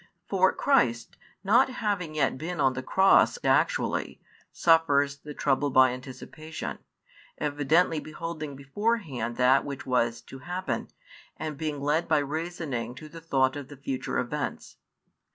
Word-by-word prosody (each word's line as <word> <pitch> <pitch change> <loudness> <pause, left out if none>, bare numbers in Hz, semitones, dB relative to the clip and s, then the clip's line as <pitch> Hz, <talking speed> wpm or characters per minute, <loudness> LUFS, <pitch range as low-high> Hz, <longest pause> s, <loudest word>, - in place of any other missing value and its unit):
For 190 -1 +3
Christ, 120 - +1 0.3
not 230 +7 +4
having 205 -10 -2
yet 140 -3 +1
been 165 +5 -5
on 135 -2 +3
the 130 - -4
Cross 190 - +4
actually, - - +1 0.3
suffers 145 -4 +3
the 150 0 -9
trouble 145 +2 +1
by 130 -1 +5
anticipation, 135 +5 -7 0.6
evidently 150 +3 +2
beholding 155 -2 -6
beforehand 140 - -2
that 130 +2 +4
which 140 -1 -6
was 120 -3 0
to 135 - -12
happen, 180 +5 -3 0.5
and 155 -1 -4
being 150 -1 -3
led 150 +4 +1
by 155 - +3
reasoning 145 -5 -3
to 155 +4 -10
the 165 +1 -11
thought 135 -4 +1
of 145 -2 -6
the 145 - -12
future 135 -1 -3
events. 145 +4 -4
145 Hz, 135 wpm, -27 LUFS, 130-165 Hz, 0.6 s, by